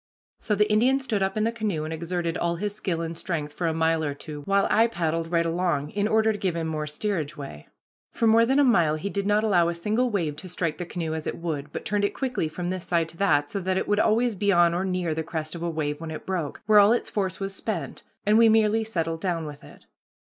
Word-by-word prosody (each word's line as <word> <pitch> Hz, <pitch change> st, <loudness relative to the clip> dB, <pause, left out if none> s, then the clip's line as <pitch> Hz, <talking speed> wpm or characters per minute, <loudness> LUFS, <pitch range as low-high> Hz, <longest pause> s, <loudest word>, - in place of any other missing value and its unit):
So 210 Hz, -, 0 dB
the 210 Hz, +1 st, +3 dB
Indian 245 Hz, +6 st, +3 dB
stood 230 Hz, -7 st, -2 dB
up 190 Hz, +2 st, 0 dB
in 215 Hz, -, +1 dB
the 225 Hz, -, +1 dB
canoe 210 Hz, -9 st, -2 dB
and 155 Hz, +1 st, -4 dB
exerted 170 Hz, +1 st, -2 dB
all 170 Hz, -1 st, 0 dB
his 205 Hz, +4 st, -3 dB
skill 185 Hz, -5 st, -2 dB
and 165 Hz, 0 st, -4 dB
strength 155 Hz, -3 st, -4 dB
for 170 Hz, -, -2 dB
a -, -, +2 dB
mile 160 Hz, 0 st, +1 dB
or 145 Hz, -2 st, -2 dB
two, 150 Hz, 0 st, -8 dB
while 195 Hz, 0 st, +2 dB
I 225 Hz, +2 st, +5 dB
paddled 165 Hz, -5 st, -2 dB
right 170 Hz, -1 st, +2 dB
along 165 Hz, -4 st, -1 dB
in 205 Hz, 0 st, 0 dB
order 220 Hz, 0 st, +3 dB
to 205 Hz, -, -5 dB
give 185 Hz, -3 st, -1 dB
him 165 Hz, -1 st, -2 dB
more 155 Hz, -1 st, -3 dB
steerage 165 Hz, -1 st, -3 dB
way. 135 Hz, -, -9 dB, 0.4 s
For 230 Hz, -, -1 dB
more 225 Hz, +1 st, +6 dB
than 265 Hz, +4 st, +2 dB
a 290 Hz, -, +6 dB
mile 170 Hz, -, +4 dB
he 195 Hz, +6 st, -4 dB
did 200 Hz, 0 st, -2 dB
not 210 Hz, +1 st, +3 dB
allow 175 Hz, -6 st, +3 dB
a 170 Hz, -, -3 dB
single 215 Hz, +8 st, 0 dB
wave 165 Hz, -9 st, -1 dB
to 185 Hz, +4 st, -8 dB
strike 165 Hz, -3 st, -2 dB
the 175 Hz, -, -4 dB
canoe 165 Hz, -3 st, -3 dB
as 160 Hz, -1 st, -4 dB
it -, -, -3 dB
would, 150 Hz, -4 st, -4 dB
but -, -, -6 dB
turned 205 Hz, 0 st, 0 dB
it 200 Hz, -, 0 dB
quickly 255 Hz, -, -1 dB
from 175 Hz, +3 st, -4 dB
this 185 Hz, -2 st, -4 dB
side 170 Hz, -2 st, +1 dB
to 165 Hz, -, -14 dB
that, 145 Hz, -7 st, +2 dB
so 200 Hz, -, -2 dB
that 185 Hz, 0 st, -1 dB
it -, -, -1 dB
would 205 Hz, 0 st, +2 dB
always 230 Hz, +2 st, +3 dB
be 200 Hz, +1 st, +1 dB
on 175 Hz, -2 st, +4 dB
or 175 Hz, +2 st, -1 dB
near 180 Hz, -3 st, -1 dB
the 160 Hz, -, -2 dB
crest 160 Hz, -1 st, -4 dB
of 170 Hz, -, -7 dB
a 170 Hz, -, -1 dB
wave 150 Hz, -2 st, -3 dB
when 165 Hz, -, -5 dB
it 155 Hz, -, -7 dB
broke, 175 Hz, -6 st, -3 dB
where 210 Hz, 0 st, +6 dB
all 205 Hz, +2 st, +6 dB
its 240 Hz, -, -2 dB
force 190 Hz, -2 st, -2 dB
was 195 Hz, 0 st, -3 dB
spent, 195 Hz, -2 st, -4 dB, 0.2 s
and 210 Hz, +2 st, +5 dB
we 230 Hz, -1 st, +7 dB
merely 220 Hz, 0 st, +3 dB
settled 165 Hz, -6 st, -2 dB
down 170 Hz, -4 st, -1 dB
with 145 Hz, -1 st, -9 dB
it. -, -, -15 dB
175 Hz, 270 wpm, -25 LUFS, 160-210 Hz, 0.4 s, we